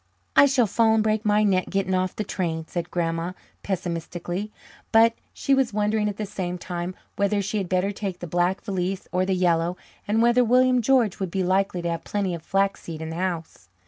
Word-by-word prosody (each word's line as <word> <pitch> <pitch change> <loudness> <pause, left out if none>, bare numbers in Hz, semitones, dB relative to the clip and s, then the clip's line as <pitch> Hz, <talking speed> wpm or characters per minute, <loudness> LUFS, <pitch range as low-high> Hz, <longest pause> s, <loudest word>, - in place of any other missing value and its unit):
"I 285 - +8
shall 265 -3 +3
fall 220 +2 +3
and 220 - +3
break 215 0 0
my 210 0 +3
neck 190 -3 +2
getting 195 -1 0
off 185 0 0
the 215 - -2
train," 165 -5 -3
said 175 -1 -4
Grandma 165 0 -2 0.3
pessimistically. 175 +1 -4 0.4
But 225 +1 +6 0.2
she 275 - 0
was 265 -5 +2
wondering 210 0 +1
at 205 - -6
the 215 - -2
same 185 -3 -4
time 175 +1 -5 0.2
whether 200 +1 +1
she 200 +2 -1
had 190 -3 -4
better 185 +2 +1
take 195 -3 -4
the 175 - -7
black 175 +3 0
valise 190 -2 -2
or 185 +1 +1
the 190 - +1
yellow, 175 -1 +1 0.3
and 215 +2 +2
whether 240 +2 +5
William 250 +1 +4
George 235 -5 +2
would 190 -2 -2
be 190 +2 -1
likely 185 -1 +1
to 170 - -1
have 165 - -4
plenty 200 -3 -1
of 170 - -5
flaxseed 195 -3 -1
in 160 0 -5
the - - -5
house. 170 - -4
190 Hz, 210 wpm, -24 LUFS, 175-215 Hz, 0.4 s, I